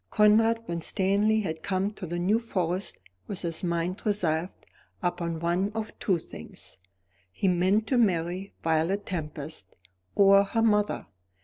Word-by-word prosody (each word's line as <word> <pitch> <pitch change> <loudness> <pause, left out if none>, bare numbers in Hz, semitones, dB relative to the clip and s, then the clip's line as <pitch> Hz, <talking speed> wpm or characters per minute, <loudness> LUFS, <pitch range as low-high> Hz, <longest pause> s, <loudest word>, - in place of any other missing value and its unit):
Conrad 225 +2 +4
Winstanley 200 +5 +1
had 160 -5 -4
come 195 +2 0
to 200 -3 -8
the 175 +2 -3
New 195 +6 +2
Forest 185 -4 -2 0.3
with 190 - -2
his 165 0 -3
mind 170 +1 -1
resolved 180 -4 -1 0.4
upon 170 -2 -1
one 175 +4 0
of 220 -1 -3
two 190 -4 +2
things. 95 - -10 0.5
He 195 - -1
meant 185 +4 +3
to 250 +1 +2
marry 185 -2 0
Violet 165 +5 +1
Tempest 155 - -6 0.4
or 195 0 +7
her 225 +3 0
mother. 210 -2 +2
185 Hz, 135 wpm, -27 LUFS, 170-210 Hz, 0.5 s, or